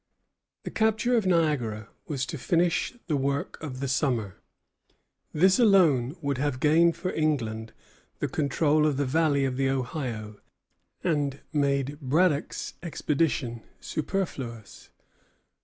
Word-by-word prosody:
The - - -6
capture 220 +3 +2
of 220 -5 +2
Niagara 140 - +1 0.2
was 135 -4 -2
to 155 - -6
finish 175 - +1
the 155 - 0
work 140 +1 -2
of 135 -4 -6
the 140 - -1
summer. 125 - -1 0.9
This 185 +7 +4
alone 165 - +4
would 140 -2 -1
have 140 -2 -1
gained 165 +3 +4
for 180 +2 -3
England 115 -8 -1 0.5
the - - -1
control 150 +1 +2
of 145 -3 0
the 145 - +1
valley 145 0 +2
of 130 -1 -2
the 135 0 +1
Ohio, 120 -5 -3 0.6
and 145 -4 0
made 140 -1 0
Braddock's 150 +2 0
expedition 150 -7 -1 0.2
superfluous. 135 - -4
145 Hz, 125 wpm, -27 LUFS, 130-165 Hz, 0.9 s, This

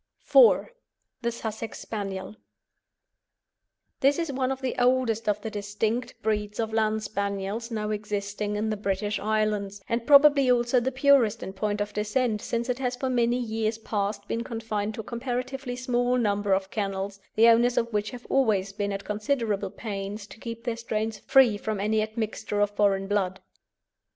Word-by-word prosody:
IV. - - +6 0.5
THE 235 - 0
SUSSEX 225 -1 -5
SPANIEL. 195 -2 -5 1.6
This 275 +1 +4
is 335 -4 -1
one 260 -1 0
of 265 - -3
the 260 -2 -1
oldest 245 -3 +2
of 210 0 +1
the 220 - -5
distinct 215 +4 -2
breeds 210 -1 -1
of 225 -1 -1
Land 220 -1 +1
Spaniels 200 +2 -3
now 215 -2 -2
existing 205 0 -3
in 215 +1 -1
the 215 - -2
British 205 +1 -1
Islands, 210 -2 -1
and 230 0 -2
probably 285 -2 +7
also 245 0 +3
the 255 +2 -1
purest 265 -5 +3
in 190 - -6
point 205 +1 -1
of 205 0 -3
descent, 210 +1 0
since 235 0 -2
it 250 0 -1
has 250 -1 -1
for 260 +1 -2
many 240 -1 +2
years 220 -2 -1
past 205 -2 -3
been 230 - -2
confined 220 -2 -3
to - - -4
a - - -14
comparatively 250 +2 -4
small 250 0 +1
number 205 -3 0
of 190 0 -1
kennels, 195 -1 -3 0.2
the 225 +2 +6
owners 240 +1 +5
of 230 -1 0
which 210 0 0
have 245 -1 -10
always 205 -7 +1
been 205 0 -2
at 200 0 -5
considerable 210 -2 -1
pains 200 0 -5
to 220 - -14
keep 230 0 -7
their 235 -2 -2
strains 220 -1 -3
free 255 -6 +5
from 215 -1 -3
any 215 +2 +1
admixture 215 -1 -3
of 205 0 +2
foreign 200 -2 +2
blood. 195 -2 -1
220 Hz, 170 wpm, -27 LUFS, 205-240 Hz, 1.6 s, probably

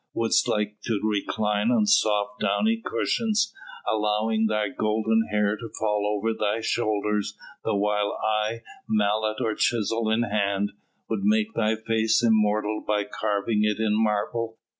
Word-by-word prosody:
Wouldst 115 -1 +2
like 105 0 -1
to 110 -3 0
recline 105 0 0
on 210 +12 +3
soft 105 - +2
downy 220 - +1
cushions, 220 -2 0 0.3
allowing 110 +1 +1
thy 105 -1 0
golden 110 -2 +1
hair 105 0 +1
to 115 +1 -8
fall 105 -1 0
over 110 +2 -1
thy 105 0 -1
shoulders 105 -2 -1 0.3
the 110 - 0
while 105 0 0
I, 110 +1 0 0.3
mallet 110 +1 +1
or 115 -4 0
chisel 115 0 0
in 110 +2 +2
hand, 100 -2 0 0.4
would - - -2
make 215 +2 +2
thy 110 0 +1
face 110 +1 +1
immortal 105 -1 +2
by 105 -1 +1
carving 105 +1 -1
it 105 -1 +1
in 110 -1 +1
marble? 110 +1 -1
110 Hz, 140 wpm, -25 LUFS, 105-115 Hz, 0.4 s, on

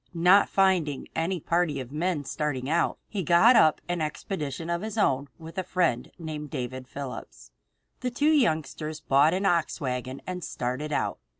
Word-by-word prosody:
Not 180 +4 +5
finding 180 -8 +1
any 175 +2 -1
party 170 -2 0
of 130 -1 -7
men 160 0 -1
starting 140 -3 -3
out, 165 +3 +1
he 205 - -3
got 175 - +6
up 155 -8 +5
an 175 -1 -2
expedition 155 -1 -4
of 170 0 -1
his 220 +1 -5
own 140 -9 +2
with 165 +3 -7
a - - -1
friend 175 -10 0
of - - -27
his 165 - -10
named 150 -1 -5
David 130 -2 -5
Phillips. 130 - -8 0.5
The 250 - -2
two 290 +5 +2
youngsters 155 - 0
bought 150 +3 +3
an 195 +2 -1
ox 170 -4 +1
team 160 - -9
wagon 130 +1 -3
and 180 -1 -5
started 130 +5 -3
out. - - -1
160 Hz, 185 wpm, -27 LUFS, 140-180 Hz, 0.5 s, got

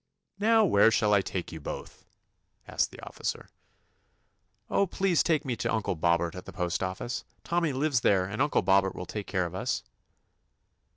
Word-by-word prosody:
*'Now 220 +1 +5
where 110 - +5
shall 105 -2 +2
I 100 - +5
take 95 -2 -4
you 80 - -8
both^" - - -7 0.6
asked - - 0
the - - -13
officer. - - -5 1.2
"Oh, 200 - +2
please 185 -1 +2
take 160 -2 +1
me 125 -3 -1
to 100 - -1
Uncle 110 -4 0
Bob 85 0 +2
bert 85 0 -3
at 90 - -9
the 95 - -8
postoffice. 95 +5 -3 0.2
Tommy 170 -2 0
lives 135 -1 +1
there, 95 -4 +3
and 105 +7 -3
Uncle 145 0 +2
Bobbert 95 0 +3
will 90 - -5
take 105 +1 -6
care 95 -2 0
of 85 - -6
us.' 95 - -2
100 Hz, 175 wpm, -28 LUFS, 90-145 Hz, 1.2 s, Now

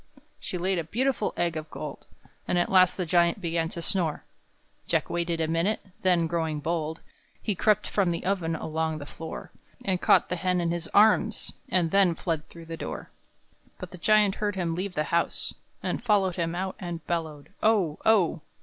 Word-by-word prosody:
She 180 - -4
laid 185 +1 0
a - - -1
beautiful 240 - 0
egg 170 -2 +1
of 155 0 -5
gold; - - -7 0.4
And 180 - +1
at 175 - +1
last 185 -1 +5
the 180 - -1
Giant 170 +2 +3
began 165 -2 -1
to 170 - -6
snore; 175 -6 -1 0.6
Jack - - 0
waited 170 -1 -1
a 160 - +1
minute, 165 +6 +1 0.2
then, 180 -3 +3
growing 160 -2 -1
bold, 160 +1 -2 0.4
He 210 - -1
crept 210 +2 +2
from 195 -4 +1
the 170 0 -2
oven 180 -4 0
along 160 0 -2
the 145 - -7
floor, 160 +2 -8 0.3
And 185 -2 0
caught - - +4
the 180 - -1
hen 180 +1 +1
in 170 -1 0
his 170 -1 -3
arms, 215 +1 +3 0.2
and 175 -6 +2
then 195 -4 +4
Fled 160 -2 -3
through 170 -1 -11
the 165 0 -6
door. - - -6 0.7
But - - -8
the 180 - -10
Giant 210 +1 +4
heard 205 -2 0
him 175 -3 -1
leave 185 +2 -3
the 150 - +1
house, 170 - 0 0.3
And - - -2
followed 200 -5 +3
him 170 -1 -1
out, 190 +1 -2
and 170 -4 -5
bellowed 160 -4 -3
"Oh 200 -9 +2
oh!" 185 -7 +3
175 Hz, 190 wpm, -27 LUFS, 165-190 Hz, 0.7 s, last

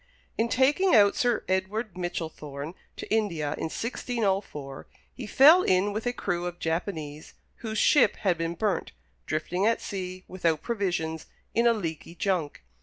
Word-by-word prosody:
In 230 +1 0
taking 285 +9 +3
out 200 -2 +6
Sir 240 -3 +1
Edward 190 +2 -1
Michellthorne 160 -4 -5 0.2
to - - -6
India, 170 -10 0
in - - -4
1604, 195 - -3 0.3
he 245 -5 -7
fell 300 - +7
in 195 - +2
with 220 +3 -3
a - - +2
crew 180 -7 -2
of 175 0 -6
Japanese, 160 -3 -4 0.2
whose 220 -2 -5
ship 290 - +5
had 190 -4 +1
been 165 0 -3
burnt, 205 +2 -1 0.3
drifting 175 +6 0
at 230 - +2
sea, 185 -1 -6
without 165 -4 -1
provisions, 175 -8 -2 0.3
in 235 +1 +3
a 235 - +5
leaky 170 -5 -5
junk. 175 - -1
185 Hz, 150 wpm, -27 LUFS, 165-220 Hz, 0.3 s, fell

